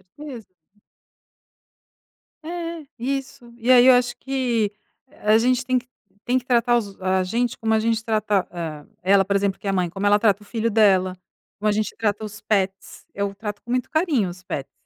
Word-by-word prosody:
Com 300 Hz, 0 st, -10 dB
certeza. 240 Hz, -8 st, -8 dB, 2.0 s
É, 335 Hz, -2 st, -5 dB
isso, 270 Hz, -1 st, -4 dB
aí 250 Hz, +1 st, +6 dB
eu 260 Hz, -, +9 dB
acho 245 Hz, -1 st, +1 dB
que 245 Hz, -6 st, -1 dB, 0.5 s
a 215 Hz, +1 st, +5 dB
gente 250 Hz, +2 st, +2 dB
tem 255 Hz, -1 st, +2 dB
que 245 Hz, -, -21 dB, 0.4 s
tem 250 Hz, +1 st, +2 dB
que 250 Hz, -, -4 dB
tratar 240 Hz, -1 st, +3 dB
os 200 Hz, -4 st, -5 dB
a 185 Hz, 0 st, +1 dB
gente 235 Hz, +5 st, -1 dB
como 220 Hz, 0 st, 0 dB
a 220 Hz, -, +4 dB
gente 225 Hz, 0 st, 0 dB
trata, 215 Hz, -3 st, +1 dB
ah, 160 Hz, -4 st, -6 dB, 0.2 s
ela 195 Hz, +1 st, +4 dB
por 200 Hz, 0 st, 0 dB
exemplo 200 Hz, -1 st, +1 dB
que -, -, -15 dB
é -, -, 0 dB
a -, -, +1 dB
mãe, 180 Hz, -2 st, 0 dB
como 195 Hz, +4 st, -4 dB
ela 205 Hz, +1 st, +5 dB
trata 205 Hz, -1 st, +2 dB
o -, -, -19 dB
filho 230 Hz, +1 st, -1 dB
dela, 190 Hz, -4 st, +4 dB, 0.4 s
como 210 Hz, +1 st, -2 dB
a -, -, +3 dB
gente 215 Hz, +1 st, -1 dB
trata 215 Hz, -1 st, -1 dB
os 210 Hz, 0 st, -8 dB
pets, 195 Hz, -2 st, -2 dB
eu 200 Hz, 0 st, -2 dB
trato 205 Hz, 0 st, -6 dB
com 240 Hz, -, -7 dB
muito 250 Hz, -1 st, 0 dB
carinho 310 Hz, -, +1 dB
os 180 Hz, 0 st, -11 dB
pets, 140 Hz, -6 st, -5 dB
215 Hz, 200 wpm, -23 LUFS, 200-245 Hz, 2.0 s, eu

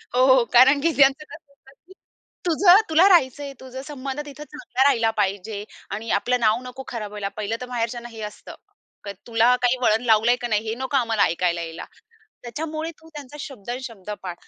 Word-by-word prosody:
हो, 255 Hz, -, +5 dB
हो, 260 Hz, -2 st, +5 dB
कारण 265 Hz, +4 st, +6 dB
की 335 Hz, -, +2 dB
त्यांचं 275 Hz, +2 st, +4 dB
कसं 300 Hz, -2 st, -15 dB
असतं 270 Hz, -, -22 dB, 0.2 s
की 380 Hz, -, -15 dB, 0.5 s
"तुझं 355 Hz, +3 st, +6 dB
तुला 325 Hz, +5 st, +5 dB
राहायचंय. 280 Hz, -4 st, +2 dB
तुझं 260 Hz, 0 st, -9 dB
संबंध 275 Hz, -1 st, -6 dB
तिथं 290 Hz, +1 st, -10 dB
चांगला 295 Hz, -3 st, -2 dB
राहिला 230 Hz, -5 st, +2 dB
पाहिजे 200 Hz, +1 st, -2 dB, 0.3 s
आणि 215 Hz, +3 st, -5 dB
आपलं 250 Hz, 0 st, 0 dB
नाव 225 Hz, +1 st, +2 dB
नको 255 Hz, +1 st, -9 dB
खराब 215 Hz, -4 st, -6 dB
व्हायला." 205 Hz, -1 st, -4 dB
पहिलं 215 Hz, +1 st, -2 dB
तर 250 Hz, -, -4 dB
माहेरच्यांना 240 Hz, 0 st, -3 dB
हे 225 Hz, -1 st, -10 dB
असतं. -, -, -13 dB, 0.5 s
क 200 Hz, -, -7 dB, 0.2 s
"तुला 235 Hz, +1 st, +3 dB
काही 250 Hz, +1 st, +2 dB
वळण 225 Hz, 0 st, +2 dB
लावलंय 225 Hz, +1 st, +4 dB
की 240 Hz, -, -2 dB
नाही, 215 Hz, -1 st, -1 dB
हे 220 Hz, -, -2 dB
नको 265 Hz, +3 st, -1 dB
आम्हाला 230 Hz, -4 st, +1 dB
ऐकायला 170 Hz, 0 st, 0 dB
यायला. 165 Hz, 0 st, -7 dB, 0.6 s
त्याच्यामुळे 310 Hz, +6 st, -5 dB
तू 320 Hz, -, -18 dB
त्यांचा 290 Hz, 0 st, -9 dB
शब्द 250 Hz, -7 st, -9 dB
न 245 Hz, -, -2 dB
शब्द 215 Hz, -6 st, -10 dB
पाळ." 180 Hz, -, -5 dB
245 Hz, 195 wpm, -23 LUFS, 220-280 Hz, 0.6 s, कारण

